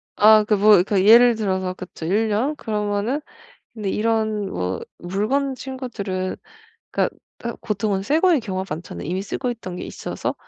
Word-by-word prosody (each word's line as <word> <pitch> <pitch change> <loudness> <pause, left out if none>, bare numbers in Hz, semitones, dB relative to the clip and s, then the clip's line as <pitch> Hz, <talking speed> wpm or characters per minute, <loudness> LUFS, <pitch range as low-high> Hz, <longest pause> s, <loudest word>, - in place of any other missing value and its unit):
아 215 0 +7
그 210 - +3
뭐 205 -2 +6
그 195 -1 +1
예를 235 +2 +8
들어서 190 -3 -1
그쵸 185 -3 -9
1 210 +6 +1
년 240 +9 0
그러면은 210 +3 -2 0.5
근데 210 -3 -3
이런 215 -2 0
뭐 90 +1 -3 0.2
물건 215 +10 -1
친구들은 235 -9 -4 0.5
그러니까 - - 0 0.3
으 235 - -3
보통은 205 -2 -1
새거의 315 - +3
경우가 190 -6 -3
많잖아요, 155 - -8
이미 185 +2 -1
쓰고 245 +4 -3
있던 200 -7 -6
게 - - -5
있어서. - - -4
210 Hz, 315 characters per minute, -22 LUFS, 190-230 Hz, 0.5 s, 예를